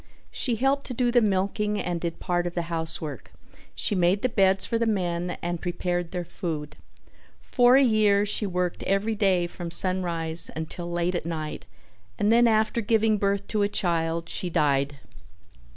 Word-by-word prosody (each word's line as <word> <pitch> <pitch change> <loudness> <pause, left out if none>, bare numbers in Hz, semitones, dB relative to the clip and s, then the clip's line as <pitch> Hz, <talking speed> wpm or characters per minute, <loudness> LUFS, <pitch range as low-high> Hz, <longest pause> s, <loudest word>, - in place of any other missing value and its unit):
She 245 -3 0
helped 270 +4 0
to 250 - -5
do 245 0 +1
the 240 0 +4
milking 210 +1 0
and 175 -2 -3
did 170 -1 -4
part 175 -1 -1
of 175 - -6
the 175 - -1
housework; 160 -5 -3 0.4
she - - 0
made 185 +2 +2
the 255 - +2
beds 195 -3 +2
for 230 - -1
the 230 - +1
men 175 -4 -1
and 175 -1 -3
prepared 175 -1 -2
their 180 -1 -4
food. 160 -3 -5 0.6
For 245 0 +4
a 275 - +6
year 210 -4 +3
she 210 0 0
worked 180 -1 -2
every 200 +3 0
day 195 -4 +2
from 175 0 -7
sunrise 170 -2 0
until 160 +2 -5
late 175 +1 0
at 175 - -3
night 155 -10 -5 0.5
and 210 +2 +3
then 235 0 +5
after 220 +1 +2
giving 220 -1 +2
birth 200 0 0
to 215 - 0
a 205 - +2
child 165 -4 -1
she 180 - -2
died. 140 -3 +1
185 Hz, 175 wpm, -26 LUFS, 170-210 Hz, 0.6 s, a